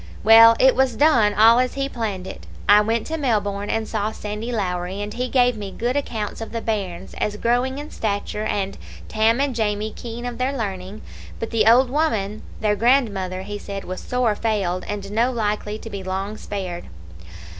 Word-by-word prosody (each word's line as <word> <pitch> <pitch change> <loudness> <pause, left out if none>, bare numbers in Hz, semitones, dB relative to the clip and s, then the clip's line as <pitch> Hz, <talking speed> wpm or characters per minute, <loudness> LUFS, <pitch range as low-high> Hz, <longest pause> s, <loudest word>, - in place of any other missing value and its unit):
Well, 225 +1 +8
it 260 0 +5
was 260 -2 +2
done 230 -6 +4
all 225 +3 +6
as 255 0 0
he 275 0 -1
planned 215 -8 -4
it. - - -9 0.2
I 205 +1 +7
went 225 +1 0
to 320 - -3
Melbourne 205 -6 -1
and 225 -1 -1
saw 215 -1 -2
Sandy 210 +3 -5
Lowrie, 185 -3 -2
and 205 0 -4
he 250 +1 -3
gave 245 -2 +3
me 205 -2 -6
good 240 +6 -2
accounts 225 -7 -3
of 225 - -6
the 230 - -3
bairns, 195 -5 -4
as 210 0 -1
growing 245 +4 0
in 295 +1 -7
stature, 210 0 -3
and 195 -2 -2 0.3
Tam 225 +2 +2
and 280 -1 +1
Jamie 215 -1 -1
keen 240 0 -7
of 245 -1 -5
their 270 +2 -1
learning, 195 -2 -5 0.4
but 225 - -4
the 225 -2 +2
old 245 +2 +5
woman, 220 -9 0 0.2
their 210 -1 +2
grandmother, 200 -6 +1
he 205 +1 -6
said 200 -1 -6
was 185 0 -6
sore 250 -3 0
failed, 200 -5 -1
and 200 -1 -5
no 235 +4 +2
likely 210 -2 -2
to 225 - -9
be 200 -1 -5
long 190 +2 -4
spared. 185 -5 -5
215 Hz, 190 wpm, -22 LUFS, 200-240 Hz, 0.4 s, Well